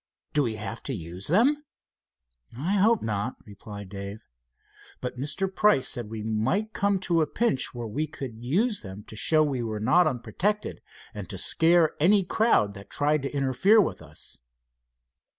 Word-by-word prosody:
"Do 150 - +3
we 115 -5 -1
have 110 +1 -6
to 135 - -1
use 90 +1 -6
them?" 260 - +3 0.9
"I 160 +9 -2
hope 220 +3 +3
not," 105 +2 -2
replied 100 -1 -10
Dave, 100 +1 -7 0.7
"but 125 - -5
Mr. 150 +8 -1
Price 210 -11 +4
said 120 -5 -1
we 110 -1 -6
might 130 - -1
come 200 -1 +1
to 170 -3 +2
a 155 - +1
pinch 145 - 0
where 120 -1 -4
we 145 +8 -2
could 125 -6 -8
use 205 - +1
them 95 0 -9
to 110 - -11
show 155 +9 +3
we 135 -4 -1
were 110 -2 -3
not 145 +11 +4
unprotected, 155 - -2 0.3
and - - -7
to - - -6
scare 165 -1 +3
any 195 +6 +5
crowd 180 - +2
that 100 -1 -12
tried 150 +1 +1
to 135 - -3
interfere 140 - +4
with 195 - 0
us." 75 -1 -9
135 Hz, 170 wpm, -26 LUFS, 110-180 Hz, 0.9 s, any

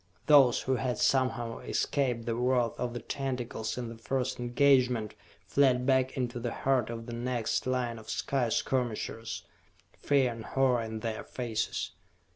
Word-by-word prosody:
Those 140 -5 +6
who 130 0 0
had 125 +1 -1
somehow 130 -3 +1
escaped 125 -5 -1
the 115 - -1
wrath 125 -1 +2
of 120 0 -2
the - - -2
tentacles 125 -4 -3
in 125 -1 -3
the 115 0 -9
first 130 +2 -2
engagement 125 -3 +3 0.3
fled 125 +4 +3
back 130 0 +2
into 125 -1 -2
the 120 0 -3
heart 130 -3 +1
of 115 -1 -5
the 120 - -7
next 120 0 -1
line 125 -3 -1
of 110 0 -13
sky 130 -1 0
skirmishers, 115 -2 -2 0.6
fear 135 -3 +2
and 115 -1 -7
horror 130 -3 +2
in 110 -1 -5
their 110 -1 -3
faces. 115 -3 -3
125 Hz, 155 wpm, -30 LUFS, 115-130 Hz, 0.6 s, Those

